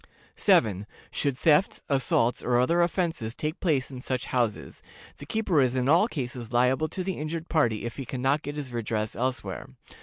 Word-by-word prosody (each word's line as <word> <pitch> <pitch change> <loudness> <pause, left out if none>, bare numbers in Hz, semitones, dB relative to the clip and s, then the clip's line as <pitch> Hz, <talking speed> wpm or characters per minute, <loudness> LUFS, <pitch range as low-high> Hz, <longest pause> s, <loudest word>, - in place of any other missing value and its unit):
"7. 105 -2 +3 0.2
Should 140 -3 -1
thefts, 155 +6 +3
assaults, 125 -3 +1
or 120 0 +2
other 165 +8 +3
offenses 165 - -1
take 155 +4 -3
place 145 -7 0
in 130 -2 -7
such 130 -1 -2
houses, 120 -4 -1 0.4
the 145 - -10
keeper 195 -8 +2
is 130 -1 +1
in 130 0 0
all 170 +9 +5
cases 125 - -5
liable 125 +5 +2
to 185 - -4
the 185 -3 -3
injured 160 +2 -4
party 120 -10 +1
if 120 - -5
he 135 - -5
can 125 +1 -5
not 140 +3 +2
get 145 0 -6
his 140 -4 -6
redress 110 -2 -2
elsewhere. 120 -7 -3
130 Hz, 185 wpm, -27 LUFS, 120-155 Hz, 0.4 s, all